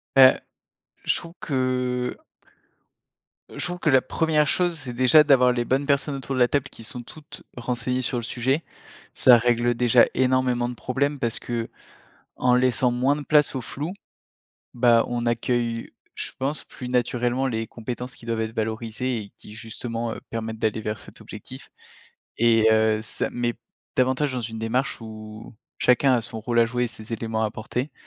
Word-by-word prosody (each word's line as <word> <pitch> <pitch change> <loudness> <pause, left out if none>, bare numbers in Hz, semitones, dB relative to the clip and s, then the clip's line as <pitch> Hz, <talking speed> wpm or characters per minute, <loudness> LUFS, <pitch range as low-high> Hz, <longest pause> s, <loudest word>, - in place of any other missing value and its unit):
Bah, 130 -1 +8 0.6
je - - +2
trouve 170 0 -7
que 125 -2 -1 1.4
je - - -1
trouve 180 0 -4
que 155 - +1
la 130 -2 +5
1re 155 0 +1
chose, 175 +2 +1
c'est 130 -3 -6
déjà 130 +5 +6
d'avoir 125 -4 +5
les 120 -1 -1
bonnes 135 +4 0
personnes 140 +1 +1
autour 135 0 -4
de - - -1
la 125 - +6
table 140 0 -1
qui 115 - -12
sont 120 +3 -6
toutes 150 +5 -12 0.2
renseignées 125 +1 -2
sur 125 - -1
le 120 - -3
sujet. 130 +7 0 0.5
Ça 125 -2 +7
règle 120 0 +2
déjà 120 0 +5
énormément 130 -1 +1
de 125 - -6
problèmes 140 +5 -1
parce 120 -3 -1
que, 115 -1 -3 0.7
en 125 -1 +3
laissant 125 0 +3
moins 130 +4 +2
de 150 - -5
place 150 -1 +3
au 130 - -2
flou, 150 +9 -5 0.8
bah, 120 -2 +4
on 120 -1 -2
accueille, 120 0 -1 0.2
je - - -4
pense, 140 +3 -2
plus 125 - -9
naturellement 125 +1 0
les 115 -3 -2
compétences 125 +3 -6
qui - - -15
doivent 115 -1 -2
être 110 0 -3
valorisées 115 +3 -2
et 100 -2 -9
qui, - - -13
justement, 115 +1 -5
heu, - - -9
permettent 110 -1 -4
d'aller 110 -1 0
vers 105 0 -3
cet - - -13
objectif, - - -10 0.7
et 115 -1 +4
heu, 110 0 +3
ça 110 - -3
met 120 -1 -1 0.4
davantage 130 +2 +1
dans 125 - -2
une 115 -1 -5
démarche 120 +5 -1
où 110 0 -10 0.2
chacun 130 +2 +4
a 120 - 0
son 110 - -7
rôle 120 +1 +1
à 115 - +6
jouer 125 +2 -1
et - - -2
ses 110 0 -8
éléments 110 0 -2
à - - +3
apporter. 120 +6 -4
125 Hz, 180 wpm, -24 LUFS, 115-130 Hz, 1.4 s, Bah